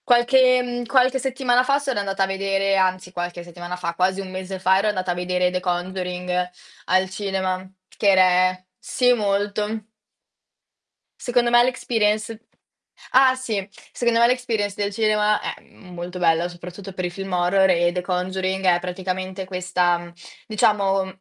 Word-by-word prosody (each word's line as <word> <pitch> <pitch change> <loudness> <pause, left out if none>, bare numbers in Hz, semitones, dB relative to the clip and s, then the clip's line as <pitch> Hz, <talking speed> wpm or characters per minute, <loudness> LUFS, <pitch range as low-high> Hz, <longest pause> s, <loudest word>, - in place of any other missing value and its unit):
Qualche, 255 +1 +5
ehm, 245 -1 -3
qualche 260 +1 +3
settimana 255 -1 +1
fa 275 +2 +2
sono 270 -6 -2
andata 195 -1 -1
a - - +3
vedere 195 0 0
anzi 185 -1 0
qualche 175 -1 -5
settimana 175 +1 -7
fa, 175 -2 -4
quasi 185 +2 0
1 190 -1 -6
mese 185 +1 -5
fa 190 +1 +3
ero 210 - 0
andata 185 -3 -1
a - - +1
vedere 180 0 0
The 180 - -1
Conjuring 180 0 -2 0.4
al 185 0 +2
cinema, 190 -1 -3 0.2
che 205 - -2
ere 185 -1 +3
sì, 250 -1 +2
molto. 210 0 -1 1.4
Secondo 245 -1 +1
me 240 0 +6
l' - - +2
experience 220 -3 -1 0.7
ah 260 0 +5
sì. 220 -7 -3 0.2
Secondo 235 -1 +1
me 235 - +6
l' - - +3
experience 225 -5 -2
del 200 0 -1
cinema 210 -1 +2
è - - -5
m 180 -2 -16
molto 175 +1 -6
bella, 165 0 +2
soprattutto 180 +2 -10
per 185 -1 -3
i - - -2
film 195 +1 -7
horror 180 +2 +3
e 175 -1 +3
The 180 +1 -3
Conduring 185 +1 -2
è 175 -1 +4
praticamente 185 +1 -4
questa, 180 -1 0
mhmm, 170 0 -11 0.3
diciamo, 195 -3 +1
190 Hz, 165 wpm, -22 LUFS, 180-215 Hz, 1.4 s, me